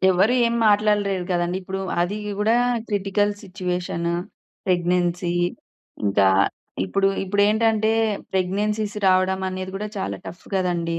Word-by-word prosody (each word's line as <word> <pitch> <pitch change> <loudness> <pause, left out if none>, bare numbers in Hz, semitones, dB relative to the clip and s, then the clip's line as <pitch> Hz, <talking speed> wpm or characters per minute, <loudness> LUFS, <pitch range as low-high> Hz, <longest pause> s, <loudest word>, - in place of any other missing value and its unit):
ఎవరు 190 +6 +3
ఏం 235 - 0
మాట్లాడలేరు 205 -3 +2
కదండీ! 175 +1 0
ఇప్పుడు 190 +1 -4 0.2
అది 180 +4 0 0.2
గూడా 220 +3 +3 0.3
క్రిటికల్ 205 0 +1
సిచుయేషను 180 -3 -3 0.5
ప్రెగ్నెన్సీ. 175 -1 +1 0.7
ఇంకా 100 0 +3 0.6
ఇప్పుడు 195 - +1 0.2
ఇప్పుడేంటంటే 215 +2 +2 0.4
ప్రెగ్నెన్సీస్ 205 +3 -1
రావడమానేది 185 0 +1
కూడా 210 +2 -4
చాలా 190 - -3
టఫ్ 175 - -9
కదండీ. 170 -3 0
190 Hz, 105 wpm, -23 LUFS, 180-205 Hz, 0.7 s, ఎవరు